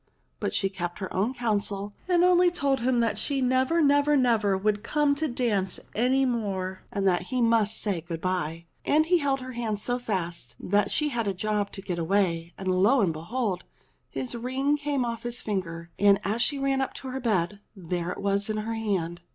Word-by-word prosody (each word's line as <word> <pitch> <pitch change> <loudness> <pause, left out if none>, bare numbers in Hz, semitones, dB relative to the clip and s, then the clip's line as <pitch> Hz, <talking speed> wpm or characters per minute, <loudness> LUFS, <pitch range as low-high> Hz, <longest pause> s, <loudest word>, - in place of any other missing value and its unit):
But - - -1
she 195 - +2
kept 175 -3 -5
her 190 -2 -5
own 220 +8 0
counsel 205 -4 -1
and 355 -1 +4
only 360 0 +5
told 280 -6 0
him 245 0 +2
that 230 -1 0
she 280 -2 0
never, 260 +6 +2
never, 285 +1 +4
never 220 -6 +3
would 205 +1 0
come 290 +5 +2
to 310 +2 -1
dance 220 -8 -1
any 260 +4 +2
more, 195 -6 -2
and 195 -1 0
that 180 -1 +1
he 255 - -1
must 225 -2 +3
say 195 -6 -1
good 165 -1 -5
bye. 170 -2 -2 0.2
And 310 +1 +3
he 355 +1 +3
held 275 -3 0
her 255 0 -6
hand 230 -4 -2
so 245 +4 -1
fast 175 - -3
that 205 +1 +1
she 300 -1 +1
had 235 -5 -1
a 195 - -1
job 210 +1 -1
to 195 - -7
get 180 -3 -3
away, 170 -2 +1
and 190 - -6
lo 200 +8 +4
and 175 -5 +2
be 155 - -7
hold! 210 +2 -2 0.5
his 255 - -4
ring 260 +4 0
came 285 -3 -1
off 230 -1 -4
his 240 0 -4
finger, 170 -5 -4
and 200 -1 +5
as 215 +4 0
she 285 +3 +2
ran 275 0 +1
up 265 - -3
to 265 - -7
her 260 +1 -3
bed 205 -5 0 0.2
there 175 -2 -3
it - - -5
was 200 +2 +1
in 215 - -1
her 220 +2 -2
hand 185 -6 -2
215 Hz, 210 wpm, -27 LUFS, 190-260 Hz, 0.5 s, only